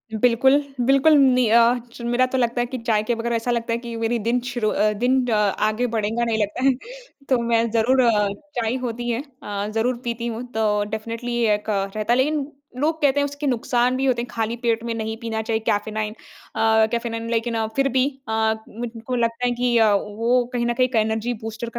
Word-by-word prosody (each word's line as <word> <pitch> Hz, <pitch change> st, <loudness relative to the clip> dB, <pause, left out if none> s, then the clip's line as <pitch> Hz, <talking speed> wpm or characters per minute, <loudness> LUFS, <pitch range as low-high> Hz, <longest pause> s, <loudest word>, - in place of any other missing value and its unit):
बिल्कुल, 250 Hz, +4 st, +4 dB, 0.3 s
बिल्कुल 275 Hz, +3 st, +5 dB
नहीं 255 Hz, -4 st, +4 dB
अ, 235 Hz, +1 st, +5 dB
च 240 Hz, -, -11 dB
मेरा 250 Hz, +1 st, +3 dB
तो 260 Hz, -, +2 dB
लगता 240 Hz, 0 st, +1 dB
है 240 Hz, -, 0 dB
कि 255 Hz, +2 st, -5 dB
चाय 210 Hz, -1 st, +3 dB
के 235 Hz, +2 st, 0 dB
बग़ैर 235 Hz, +1 st, -2 dB
ऐसा 230 Hz, +1 st, -1 dB
लगता 230 Hz, -1 st, -1 dB
है -, -, 0 dB
कि 235 Hz, -1 st, -7 dB
मेरी 235 Hz, +1 st, 0 dB
दिन 245 Hz, +1 st, +2 dB
शुरू 230 Hz, -4 st, -1 dB
अ, 210 Hz, 0 st, +2 dB
दिन 255 Hz, +1 st, +2 dB
अ, 235 Hz, -, +1 dB
आगे 215 Hz, +3 st, +1 dB
बढ़ेगा 220 Hz, +2 st, 0 dB
नहीं 225 Hz, -1 st, 0 dB
लगता 210 Hz, +5 st, -2 dB
है। 270 Hz, -, +5 dB, 0.6 s
तो 260 Hz, -, +4 dB
मैं 230 Hz, 0 st, +2 dB
ज़रूर 240 Hz, +4 st, +3 dB
अ, 215 Hz, -4 st, +3 dB, 0.3 s
चाय 225 Hz, +1 st, 0 dB
होती 240 Hz, 0 st, -3 dB
है 235 Hz, +2 st, -1 dB, 0.2 s
अ, 205 Hz, 0 st, -3 dB
ज़रूर 240 Hz, +2 st, +1 dB
पीती 235 Hz, 0 st, -3 dB
हूँ 230 Hz, +1 st, -4 dB
तो 210 Hz, -2 st, +1 dB
डेफिनिटली 230 Hz, +2 st, -4 dB, 0.2 s
एक 210 Hz, +1 st, -7 dB
रहता 210 Hz, +2 st, -1 dB
है 245 Hz, -, +2 dB
लेकिन 290 Hz, +1 st, +1 dB, 0.3 s
लोग 315 Hz, +4 st, 0 dB
कहते 285 Hz, -1 st, +3 dB
हैं 285 Hz, -, +2 dB
उसके 285 Hz, +1 st, -4 dB
नुकसान 245 Hz, 0 st, +1 dB
भी 265 Hz, -, 0 dB
होते 250 Hz, -3 st, +1 dB
हैं। 240 Hz, -, -5 dB
खाली 225 Hz, 0 st, -2 dB
पेट 230 Hz, -1 st, +1 dB
में 235 Hz, -1 st, -2 dB
नहीं 220 Hz, 0 st, -3 dB
पीना 225 Hz, -1 st, -2 dB
चाहिए, 220 Hz, 0 st, -1 dB
कैफ़ेनाइन 210 Hz, +1 st, -1 dB, 0.4 s
अ, 220 Hz, 0 st, +4 dB
कैफ़ेनाइन 230 Hz, -1 st, -3 dB
लेकिन 230 Hz, -1 st, -1 dB
फिर 275 Hz, 0 st, +2 dB
भी 255 Hz, -, +4 dB, 0.2 s
अ, 220 Hz, 0 st, +2 dB, 0.2 s
मुझको 235 Hz, +2 st, -5 dB
लगता 235 Hz, +1 st, 0 dB
है 245 Hz, -, +2 dB
कि 245 Hz, 0 st, +1 dB
अ, 220 Hz, -2 st, +5 dB
वो 230 Hz, +5 st, +1 dB
कहीं 235 Hz, -1 st, 0 dB
न 240 Hz, -, +1 dB
कहीं 255 Hz, +1 st, +2 dB
एक 250 Hz, -, -6 dB
एनर्जी 220 Hz, +2 st, 0 dB
बूस्टर 225 Hz, +1 st, -5 dB
235 Hz, 215 wpm, -22 LUFS, 220-245 Hz, 0.6 s, बिल्कुल